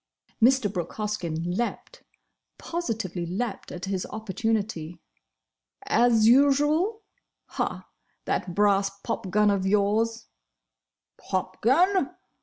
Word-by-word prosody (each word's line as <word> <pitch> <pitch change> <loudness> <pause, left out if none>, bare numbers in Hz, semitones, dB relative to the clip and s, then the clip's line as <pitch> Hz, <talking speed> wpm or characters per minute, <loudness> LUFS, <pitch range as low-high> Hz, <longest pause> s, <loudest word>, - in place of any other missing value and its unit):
Mr. 235 -4 +4
Brooke 175 -4 -4
Hoskyn 195 -7 -3
leaped—positively 225 - -5
leaped 200 +4 -4
at 180 +1 -6
his 190 -1 -2
opportunity. 210 -6 -3 0.9
"As 230 -2 +4
usual!—Ha! 295 - +1 0.4
That 175 - -2
brass 200 -1 +3
popgun 210 -2 +1
of 195 -1 0
yours—" 215 +3 +1 0.9
"Popgun! 265 - +1
215 Hz, 75 wpm, -26 LUFS, 190-245 Hz, 0.9 s, Mr